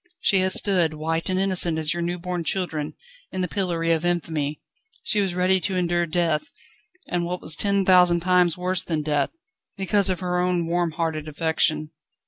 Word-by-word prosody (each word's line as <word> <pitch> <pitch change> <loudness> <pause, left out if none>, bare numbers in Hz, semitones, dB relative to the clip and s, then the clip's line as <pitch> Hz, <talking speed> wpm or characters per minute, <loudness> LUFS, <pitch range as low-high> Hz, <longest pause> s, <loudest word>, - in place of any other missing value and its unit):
She 195 - +3
has 185 0 +3
stood, 175 -6 +1
white 165 +3 -2
and 185 0 0
innocent 185 -4 +3
as 160 +1 0
your 175 - -4
new 175 +1 -2
born 180 0 -4
children, 160 -4 -2 0.4
in 185 - -3
the 180 - 0
pillory 170 -3 -1
of 165 0 +1
infamy. 160 -4 -2 0.4
She 210 - +2
was 190 -3 -1
ready 185 +1 +3
to 190 +2 -2
endure 175 -1 0
death, 165 -2 0 0.6
and 175 -1 -1
what 180 +1 -3
was 155 - +1
ten 200 0 +2
thousand 180 -2 +5
times 180 -1 +3
worse 180 0 -1
than 155 -3 -2
death, 150 -2 0 0.5
because 195 +1 +2
of 185 - -1
her 180 -1 -1
own 180 -1 0
warm 170 -1 0
hearted 160 -2 -3
affection. 155 0 0
175 Hz, 185 wpm, -23 LUFS, 160-185 Hz, 0.6 s, thousand